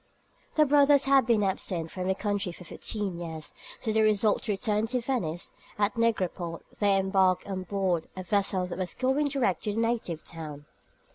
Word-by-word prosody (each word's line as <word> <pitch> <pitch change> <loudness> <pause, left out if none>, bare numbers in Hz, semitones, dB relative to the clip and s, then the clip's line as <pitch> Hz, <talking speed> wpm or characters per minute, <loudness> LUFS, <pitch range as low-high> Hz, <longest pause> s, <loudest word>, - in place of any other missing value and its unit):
The 305 - +5
brothers 285 -1 +5
had 270 -3 +4
been 225 -3 +3
absent 180 -4 -2
from 185 -1 -4
their 190 - +2
country 205 -2 -1
for 175 - -11
fifteen 195 0 -4
years, 160 -3 -6 0.3
so 220 - -2
they 220 0 +3
resolved 215 0 +3
to 215 - 0
return 210 +2 0
to 250 +2 0
Venice, 210 -10 -2 0.3
and 205 - +4
at - - -28
Negropont 185 -7 -1 0.2
they 200 -2 +4
embarked 190 -1 +2
on 190 -2 -3
board 185 -3 0
a 185 - -4
vessel 195 -1 +1
that 180 +1 -6
was 185 -1 -3
going 265 +3 +2
direct 260 -10 0
to 210 - 0
their 220 - -1
native 225 -8 -1
town. 150 -3 -8
200 Hz, 190 wpm, -28 LUFS, 180-230 Hz, 0.3 s, The